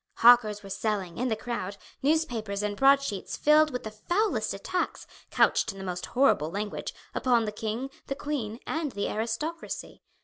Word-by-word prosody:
Hawkers 225 -3 +6
were 195 - -9
selling, 195 -3 -2
in 250 - +1
the 225 - +1
crowd, 205 -4 -4 0.2
newspapers 235 -9 0
and 205 0 -1
broadsheets 275 -5 +2
filled 305 +1 +5
with 250 -3 -4
the 215 - -5
foulest 350 - 0
attacks, 365 - -3 0.2
couched - - +3
in 195 - -12
the 195 - -7
most 180 -1 -4
horrible 245 - +3
language, 205 +3 -4 0.2
upon 240 -3 +2
the 210 - -2
king, 225 +5 -4 0.2
the 275 - -2
queen, 250 -7 -3
and 315 -4 -2
the 200 - -1
aristocracy. 230 +10 -4
225 Hz, 165 wpm, -28 LUFS, 205-275 Hz, 0.2 s, Hawkers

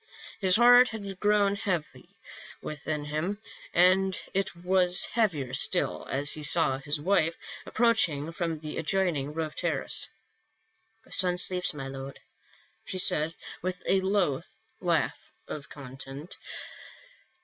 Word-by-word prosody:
His 185 -2 +4
heart 245 +2 +7
had 200 -4 -7
grown 205 -1 +3
heavy 185 -7 -4 0.4
within 150 0 -5
him, 155 +8 -3 0.3
and 185 +2 +3
it 195 -2 -1
was 180 0 +3
heavier 160 - -1
still - - +2
as 140 +2 +2
he 155 - -5
saw 135 -2 +4
his 145 +2 -3
wife 165 -1 +1 0.3
approaching 175 -11 +2
from 165 -2 -3
the 155 0 -6
adjoining 165 -4 0
roof 155 0 -4
terrace. - - -2 0.5
" 225 0 -38
Our - - -21
son 180 -1 +1
sleeps, 180 0 +2
my 135 -2 -6
lord," 135 0 -8 0.6
she 185 - -6
said, 165 -2 +4 0.3
with 180 0 -4
a 190 - +2
low 190 -8 +1 0.4
laugh - - 0 0.3
of 145 -2 -7
content. 135 +3 -10
180 Hz, 125 wpm, -28 LUFS, 150-195 Hz, 0.6 s, heart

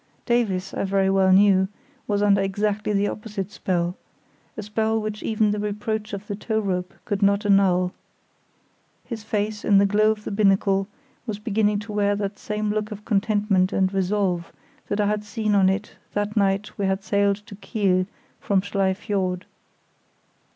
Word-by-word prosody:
Davies, 200 -6 0
I - - -2
very 195 0 +2
well 190 -1 +4
knew, 190 0 +5 0.4
was 205 -1 +1
under 200 -1 +4
exactly 205 +2 -1
the 205 0 +2
opposite 210 -3 -5
spell—a 180 +4 -5
spell 220 +1 0
which 215 0 -4
even 215 -1 +1
the 210 - -1
reproach 210 +1 -3
of 200 0 -6
the 205 - -4
tow 220 +1 -1
rope 185 -3 -2
could 205 0 -2
not 200 +1 +3
annul. 185 -3 +3 1.1
His 225 -4 -6
face, 210 0 -2
in 200 - +4
the 200 - +5
glow 210 +2 +3
of 215 -1 -1
the - - -5
binnacle, 195 -1 +2 0.4
was 215 -2 -3
beginning 210 -1 +1
to 210 +1 -8
wear 205 -1 +1
that 200 0 -4
same 210 0 -2
look 210 0 -2
of 210 -1 -9
contentment 205 -3 +2
and 190 0 +1
resolve 190 -2 0 0.4
that 205 - -2
I 205 - +3
had 210 0 0
seen 210 +1 -1
on 195 -2 +5
it 200 +2 -2 0.2
that 205 +1 -2
night 200 0 +1
we 195 - +1
had 190 0 -1
sailed 200 -1 +2
to 215 - -11
Kiel 190 -3 0 0.3
from 195 -2 +1
Schlei 195 -1 0
Fiord. 190 -3 -2
205 Hz, 170 wpm, -24 LUFS, 195-210 Hz, 1.1 s, knew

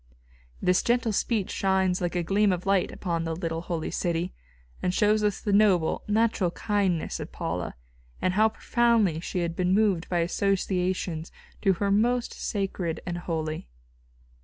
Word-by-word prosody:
This 180 0 +4
gentle 235 -2 +1
speech 210 -1 0
shines 190 -1 +1
like 175 0 -1
a 175 - +1
gleam 200 +3 +3
of 180 0 -2
light 195 -2 +2
upon 170 -3 -2
the 165 -1 -2
little 165 -1 -3
holy 170 -2 -3
city, 170 0 -1 0.5
and 180 - +1
shows 210 +2 +2
us 205 -2 +1
the 205 - -1
noble, 195 -6 +3
natural 215 -3 +2
kindness 190 -2 -1
of - - -6
Paula, - - -4 0.4
and 185 - +1
how 215 +3 +4
profoundly 225 -7 +2
she 175 +1 -3
had 170 -1 -2
been 180 +1 +2
moved 200 -5 +2
by 175 -2 +1
associations 180 -2 -1 0.3
to 195 -2 +4
her 200 +3 -1
most 240 +4 +2
sacred 190 -5 -2
and 175 -1 -3
holy. 160 - -3
185 Hz, 160 wpm, -27 LUFS, 175-205 Hz, 0.5 s, This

